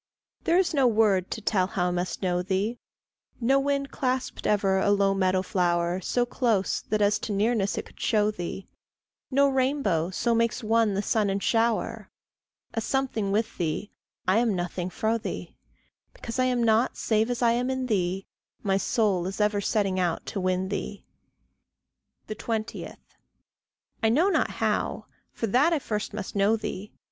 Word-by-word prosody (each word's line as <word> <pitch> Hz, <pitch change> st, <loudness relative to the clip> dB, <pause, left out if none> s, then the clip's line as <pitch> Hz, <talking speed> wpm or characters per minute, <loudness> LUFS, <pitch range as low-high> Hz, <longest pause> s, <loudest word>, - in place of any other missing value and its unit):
There 340 Hz, -, +4 dB
is 365 Hz, -2 st, +2 dB
no 275 Hz, -4 st, +4 dB
word 210 Hz, -5 st, +3 dB
to 220 Hz, -, -4 dB
tell 190 Hz, -3 st, +1 dB
how 180 Hz, -1 st, 0 dB
I -, -, -1 dB
must 180 Hz, +2 st, -3 dB
know 180 Hz, -1 st, +1 dB
thee; 195 Hz, +6 st, -1 dB, 0.6 s
No 265 Hz, +3 st, +3 dB
wind 280 Hz, 0 st, -1 dB
clasped 260 Hz, -2 st, -2 dB
ever 195 Hz, -2 st, +2 dB
a 200 Hz, -, +2 dB
low 200 Hz, -1 st, +3 dB
meadow 185 Hz, -1 st, +1 dB
flower 175 Hz, -1 st, 0 dB
So 245 Hz, +6 st, +1 dB
close 230 Hz, -6 st, 0 dB
that 210 Hz, 0 st, 0 dB
as 205 Hz, +1 st, +3 dB
to 215 Hz, -, -4 dB
nearness 205 Hz, 0 st, +1 dB
it -, -, -3 dB
could -, -, -18 dB
show 210 Hz, -1 st, +2 dB
thee; 185 Hz, 0 st, -6 dB, 0.6 s
No 280 Hz, +1 st, +4 dB
rainbow 260 Hz, -, +1 dB
so 235 Hz, +5 st, 0 dB
makes 230 Hz, +1 st, +1 dB
one 220 Hz, -2 st, +2 dB
the 200 Hz, -, -1 dB
sun 210 Hz, -1 st, +1 dB
and 195 Hz, 0 st, -1 dB
shower. 230 Hz, 0 st, 0 dB, 0.6 s
A 225 Hz, -, -1 dB
something 230 Hz, -5 st, -1 dB
with 220 Hz, +3 st, -1 dB
thee, 170 Hz, +4 st, -2 dB, 0.4 s
I 190 Hz, +4 st, +4 dB
am 240 Hz, -1 st, +2 dB
a -, -, +1 dB
nothing 180 Hz, 0 st, -3 dB
fro' 220 Hz, +4 st, 0 dB
thee. 185 Hz, -5 st, -6 dB, 0.6 s
Because 230 Hz, +2 st, -6 dB
I 255 Hz, -, +4 dB
am 250 Hz, -2 st, +1 dB
not 225 Hz, +2 st, +2 dB
save 220 Hz, +1 st, +1 dB
as 245 Hz, 0 st, -1 dB
I 235 Hz, -, +5 dB
am 245 Hz, +2 st, 0 dB
in 260 Hz, -1 st, -1 dB
thee, 190 Hz, -4 st, -1 dB, 0.4 s
My 195 Hz, -1 st, +2 dB
soul 195 Hz, -5 st, +1 dB
is 195 Hz, +2 st, -5 dB
ever 210 Hz, -1 st, +2 dB
setting 195 Hz, -3 st, 0 dB
out 175 Hz, -2 st, -1 dB
to 195 Hz, -, -4 dB
win 185 Hz, 0 st, 0 dB
thee. 205 Hz, 0 st, -5 dB, 1.2 s
20. 220 Hz, 0 st, -4 dB, 1.1 s
I 225 Hz, -, +3 dB
know 315 Hz, -, +3 dB
not -, -, +2 dB
how -, -, -1 dB, 0.3 s
for -, -, -3 dB
that 260 Hz, -, +3 dB
I -, -, +3 dB
first 210 Hz, -7 st, -3 dB
must 210 Hz, -1 st, -6 dB
know 200 Hz, +2 st, +3 dB
thee. 210 Hz, -2 st, -5 dB
210 Hz, 175 wpm, -26 LUFS, 190-235 Hz, 1.2 s, I